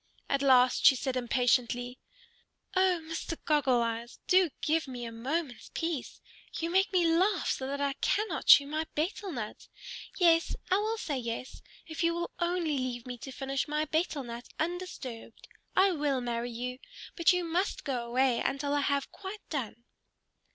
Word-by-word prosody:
At 275 0 +1
last 255 -2 +5
she 270 - +8
said 260 0 -2
impatiently, 245 0 +1 0.8
"O 370 -2 +3
Mr. 325 0 -4
Goggle 265 -6 +3
Eyes! 230 +1 -4
Do 365 -2 +5
give 315 0 +1
me 245 -2 -6
a 230 - -6
moment's 255 +2 -3
peace! 325 -6 -3 0.4
You 330 +1 -2
make 380 +2 +3
me 360 -3 +3
laugh 360 +3 +2
so 260 - -3
that 280 +1 -3
I 280 -1 0
cannot 410 -6 0
chew 280 - +9
my 310 +2 -2
betel 370 +5 -2
nut. 225 -7 -6 0.5
Yes, 335 -2 +4 0.2
I 375 - +5
will 435 +2 -1
say 290 -10 -3
yes, 235 +1 -5 0.2
if 320 +1 -4
you 335 0 +2
will 345 0 -3
only 345 -5 0
leave 245 -2 -3
me 250 -1 -7
to 270 - -8
finish 270 +2 -2
my 300 +1 0
betel 315 -2 -1
nut 235 0 -8
undisturbed. 315 -10 -5 0.3
I 385 +1 +5
will 290 -5 0
marry 240 -1 -2
you. 250 +2 -5 0.4
But 335 0 +5
you 360 -1 +1
must 345 +4 -1
go 255 -4 -2
away 245 +1 +2
until 285 +1 -1
I 290 - +2
have 280 -1 0
quite 400 +1 -9
done." 235 -5 -4
285 Hz, 170 wpm, -30 LUFS, 250-335 Hz, 0.8 s, chew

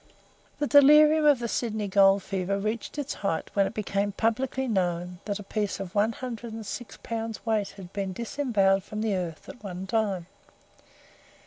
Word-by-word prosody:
The 295 - 0
delirium 300 +2 +7
of 290 -2 +6
the 235 0 -3
Sydney 220 -3 -2
gold 195 0 +5
fever 195 0 -2
reached 215 +6 -3
its 290 -1 -3
height 195 -5 -2
when 200 -1 +3
it 195 - -8
became 205 -1 -1
publicly 255 +5 0
known 180 -4 -1
that 205 -2 -2
a 205 - -8
piece 205 0 -2
of 195 -2 -6
one 215 +2 +2
hundred 235 -2 -6
and 225 -1 -7
six 200 +1 -7
pounds 225 -1 -4
weight 215 -3 +1
had 185 -2 -11
been 195 -2 -2
disembowelled 210 -4 +1
from 210 +2 -5
the 220 -2 0
earth, 175 -4 -4
at 245 - -11
one 185 -1 -5
time. 195 -4 0
210 Hz, 180 wpm, -27 LUFS, 195-235 Hz, -, delirium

